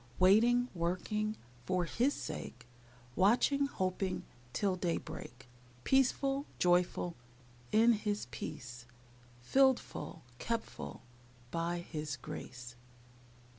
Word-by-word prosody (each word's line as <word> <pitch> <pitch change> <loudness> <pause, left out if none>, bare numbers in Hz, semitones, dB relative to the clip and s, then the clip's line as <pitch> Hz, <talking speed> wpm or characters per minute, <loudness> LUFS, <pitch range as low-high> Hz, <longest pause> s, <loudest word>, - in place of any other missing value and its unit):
Waiting, 235 +6 +5
working, 200 +5 -1 0.3
For 180 -1 +1
His 250 +10 +1
sake; 115 0 -6 0.5
Watching, 250 +8 +4
hoping, 185 -5 -1 0.3
Till 195 +6 +1
daybreak. 160 -8 -4 0.4
Peaceful, 270 +1 +2
joyful, 175 -1 +2 0.6
In 225 +2 +6
His 210 -2 0
peace; 120 +1 -7 0.6
Filled 265 - +5
full, - - -8 0.2
kept 230 -1 -1
full, - - -8 0.5
By 170 +1 -1
His 150 -4 -4
grace. 125 -1 -8
185 Hz, 95 wpm, -34 LUFS, 165-235 Hz, 0.6 s, In